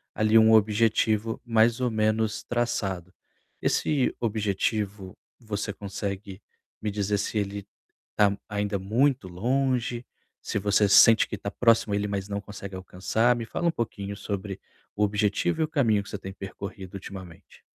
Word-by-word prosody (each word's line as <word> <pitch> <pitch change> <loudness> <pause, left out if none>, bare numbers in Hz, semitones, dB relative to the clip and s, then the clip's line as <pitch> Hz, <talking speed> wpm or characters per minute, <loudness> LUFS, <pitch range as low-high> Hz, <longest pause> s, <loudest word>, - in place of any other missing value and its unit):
ali 110 +1 +4
um 110 0 +6
objetivo 110 0 +2
mais 115 +1 +3
ou 125 -1 +1
menos 110 0 0
traçado. 95 -7 -2 0.5
Esse 140 -4 +1
objetivo, 105 -2 -2 0.2
você 105 -3 -4
consegue 100 0 -6 0.4
me 105 - -1
dizer 105 0 0
se 105 - -2
ele 100 -1 -3 0.5
tá 100 -1 +3
ainda 105 -1 -2
muito 120 +4 +1
longe, 125 +5 -1 0.4
se - - -3
você 100 +1 +3
sente 115 +3 +7
que 105 - -5
tá 100 - -5
próximo 115 -2 +3
a - - +2
ele, 105 0 -1
mas 100 -1 -3
não 100 0 -2
consegue 100 -1 -8
alcançar? 95 +6 +1
Me 115 -1 -4
fala 170 +9 -2
um - - +3
pouquinho 100 -7 -4
sobre 100 -1 -5 0.4
o 105 - +1
objetivo 105 - +1
e - - +4
o - - -8
caminho 115 -9 +2
que - - -12
você - - -4
tem 95 -1 -8
percorrido 95 0 -8
ultimamente. 95 -3 -10
105 Hz, 155 wpm, -26 LUFS, 100-115 Hz, 0.5 s, sente